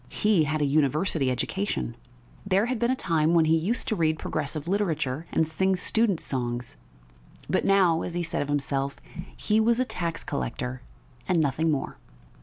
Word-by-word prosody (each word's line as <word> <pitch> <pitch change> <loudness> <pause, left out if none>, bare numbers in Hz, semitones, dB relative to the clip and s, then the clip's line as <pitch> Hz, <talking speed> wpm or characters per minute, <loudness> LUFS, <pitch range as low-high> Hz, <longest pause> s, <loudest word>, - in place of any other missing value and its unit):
He 205 -7 +2
had 150 - -1
had 155 - -1
a - - +3
university 150 +1 +1
education; 130 - -2 0.5
there 200 +1 +2
had 250 -1 -2
been 235 - +1
a 260 - +2
time 165 -6 +1
when 165 -1 +5
he 160 +1 +4
used 185 +10 -1
to 220 - 0
read 160 -3 +1
progressive 155 0 -3
literature 165 -7 -1
and 160 - +2
sing 190 +4 +1
students' 205 -1 +1
songs, 120 -2 -2 0.7
but - - 0
now, 185 -4 +4
as 175 - -5
he 175 - -1
said 170 - -2
of 145 - -2
himself, 140 -1 -1 0.4
he 215 0 +1
was 230 +2 +3
a 255 - +2
tax 170 -8 -2
collector 130 -5 -4 0.5
and 180 -2 +2
nothing 160 +2 +1
more. 145 -3 -2
160 Hz, 180 wpm, -26 LUFS, 145-195 Hz, 0.7 s, when